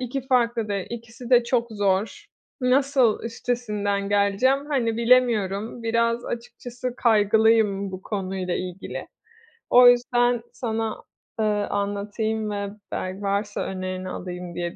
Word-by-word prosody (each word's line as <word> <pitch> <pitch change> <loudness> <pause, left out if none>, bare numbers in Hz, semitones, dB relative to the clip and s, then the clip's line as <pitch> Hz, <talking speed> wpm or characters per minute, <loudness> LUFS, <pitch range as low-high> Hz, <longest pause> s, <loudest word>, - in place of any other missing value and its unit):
2 255 +1 -4
farklı 235 -3 +1
dil, 200 -2 -2
ikisi 235 +1 -8
de 245 -1 +6
çok 235 -1 +1
zor. 205 - -1 0.3
Nasıl 255 -2 +3
üstesinden 210 -4 -2
geleceğim, 205 +8 +2
hani, 230 -6 0
bilemiyorum. 230 -3 +2
Biraz 230 +1 +1
açıkçası 245 +1 -6
kaygılıyım 215 -3 +3
bu 185 - -7
konuyla 190 -3 -3
ilgili. 180 0 -6 0.6
O 245 0 +8
yüzden 245 0 +2
sana, 225 -2 -3 0.4
ııı, 210 -1 +1
anlatayım 210 +2 -2
ve 200 0 -3 0.2
bel 185 +1 -3
varsa 200 +1 -1
önerini 185 0 -4
alayım 180 -1 -6
diye 175 -1 -3
220 Hz, 120 wpm, -24 LUFS, 200-240 Hz, 0.6 s, O